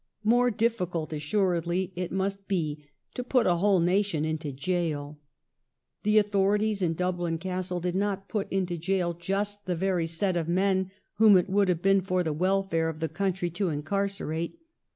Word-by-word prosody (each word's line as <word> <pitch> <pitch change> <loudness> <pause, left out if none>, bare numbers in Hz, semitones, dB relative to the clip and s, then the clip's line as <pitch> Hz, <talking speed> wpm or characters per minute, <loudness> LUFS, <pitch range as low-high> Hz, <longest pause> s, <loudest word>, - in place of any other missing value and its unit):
More 245 +3 +4
difficult, 195 -8 -1
assuredly, 175 +2 0
it 180 -1 -3
must 195 +1 -2
be 155 -6 -2 0.3
to 250 - -4
put 250 -1 +2
a 175 -1 +3
whole 195 +1 +3
nation 180 -2 +1
into 155 -2 -3
jail. 150 -1 -2 0.8
The 210 +1 +3
authorities 205 0 +2
in 165 -2 +1
Dublin 175 -1 -1
Castle 185 0 -3
did 175 0 -2
not 195 0 -1
put 210 -3 -3
into 180 -3 -1
jail 175 0 0
just 200 +4 -3
the 180 - 0
very 180 -1 0
set 180 +3 -1
of 165 -2 -1
men 190 +1 +1 0.3
whom 210 -2 +7
it 180 +1 0
would 200 0 +3
have 175 -2 0
been 195 0 +4
for 185 -1 0
the 160 -3 -1
welfare 185 -1 +1
of 160 -1 -6
the 160 0 -1
country 180 0 -1
to 185 +2 -1
incarcerate. 170 - -2
185 Hz, 170 wpm, -28 LUFS, 170-200 Hz, 0.8 s, whom